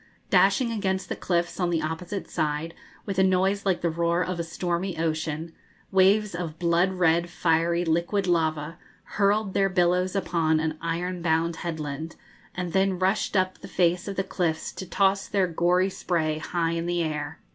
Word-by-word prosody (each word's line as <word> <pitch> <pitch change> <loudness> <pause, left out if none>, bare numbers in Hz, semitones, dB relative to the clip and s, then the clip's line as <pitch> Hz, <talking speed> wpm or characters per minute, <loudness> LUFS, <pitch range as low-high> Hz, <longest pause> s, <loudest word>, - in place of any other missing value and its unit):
Dashing 200 +5 +4
against 190 -4 -2
the - - -2
cliffs 175 0 -1
on 180 -2 +1
the 165 -2 0
opposite 175 +5 -4
side, 155 +2 -2 0.3
with 195 -2 -2
a - - +6
noise 190 +2 +2
like 185 -2 +1
the 170 - +1
roar 170 +2 +1
of 180 -1 -4
a - - 0
stormy 175 +2 -3
ocean, 160 0 -2 0.4
waves 195 +2 +4
of 170 -3 -5
blood 175 +2 +2
red, 170 -1 +2
fiery, 170 +1 +1
liquid 170 +5 0
lava 160 -2 0 0.2
hurled 200 0 +1
their 195 0 +2
billows 180 +1 +1
upon 165 -4 +1
an 155 0 -1
iron 175 +2 -2
bound 165 0 +1
headland, 160 -1 -5 0.4
and 180 -2 -4
then 190 -1 +2
rushed 190 +2 +1
up 185 0 0
the 195 - -10
face 180 -1 +1
of 200 - -4
the 195 - 0
cliffs 170 -4 -2
to 185 - -8
toss 195 +2 +2
their 200 -2 +2
gory 180 +2 +2
spray 155 -4 -1
high 165 0 -1
in 170 0 -2
the 175 -1 0
air. 150 0 -3
175 Hz, 175 wpm, -26 LUFS, 165-190 Hz, 0.4 s, a